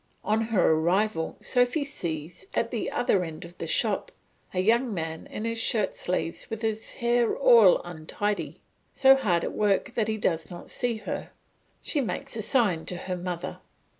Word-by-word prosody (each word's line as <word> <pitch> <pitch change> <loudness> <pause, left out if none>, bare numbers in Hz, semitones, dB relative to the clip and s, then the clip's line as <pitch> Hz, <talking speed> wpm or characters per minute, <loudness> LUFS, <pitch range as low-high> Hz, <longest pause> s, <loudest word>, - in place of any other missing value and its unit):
On 215 +1 +1
her 215 -7 +3
arrival, 170 +2 +1
Sophy 250 +4 +2
sees, 170 - -5
at 230 - 0
the 230 - -2
other 205 -6 +1
end 165 +1 -7
of 175 +1 -13
the 165 - -4
shop, 205 +4 0 0.4
a 185 - -2
young 230 +6 +3
man 160 -4 -4
in 215 - -5
his 230 0 -1
shirt 210 -5 +1
sleeves, 175 -2 -2
with 225 0 -5
his 220 0 -1
hair 240 -1 +2
all 230 -8 +7
untidy, 175 +5 -3 0.3
so 270 0 +6
hard 180 -10 +1
at - - -3
work 210 +4 +1
that 220 -2 0
he 220 0 -1
does 165 -6 -1
not 175 -1 -8
see 245 -2 0
her; - - -4 0.5
she 295 - 0
makes 265 +4 -3
a 225 - -2
sign 210 -8 +2
to 180 - -3
her 180 +1 -4
mother. 175 -1 -5
210 Hz, 175 wpm, -27 LUFS, 175-235 Hz, 0.5 s, all